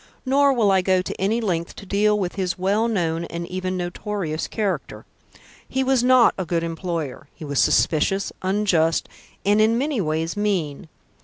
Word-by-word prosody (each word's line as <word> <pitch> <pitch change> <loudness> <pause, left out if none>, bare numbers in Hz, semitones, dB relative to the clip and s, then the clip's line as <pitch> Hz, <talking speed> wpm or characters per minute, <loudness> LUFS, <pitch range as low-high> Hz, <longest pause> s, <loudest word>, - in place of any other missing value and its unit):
Nor 280 +2 +4
will 225 -6 +3
I 190 -1 +4
go 185 0 +2
to - - -6
any 215 +4 +1
length 175 -7 -2
to - - -10
deal 210 +2 +2
with 185 -3 -2
his 185 -3 -2
well 200 +5 +1
known 170 -6 -1
and 170 0 -5
even 185 0 -3
notorious 175 -2 -3
character. 210 -4 -3 0.6
He 265 - 0
was 260 -2 +2
not 250 -2 +5
a - - 0
good 170 0 -1
employer; 165 -4 -4
he 160 - -9
was 140 -2 -1
suspicious, 195 +5 +2
unjust, 185 -4 +1 0.4
and 205 +2 +4
in 225 +2 +3
many 275 -3 0
ways 160 0 -2
mean. 185 -6 -2
190 Hz, 170 wpm, -22 LUFS, 170-210 Hz, 0.6 s, not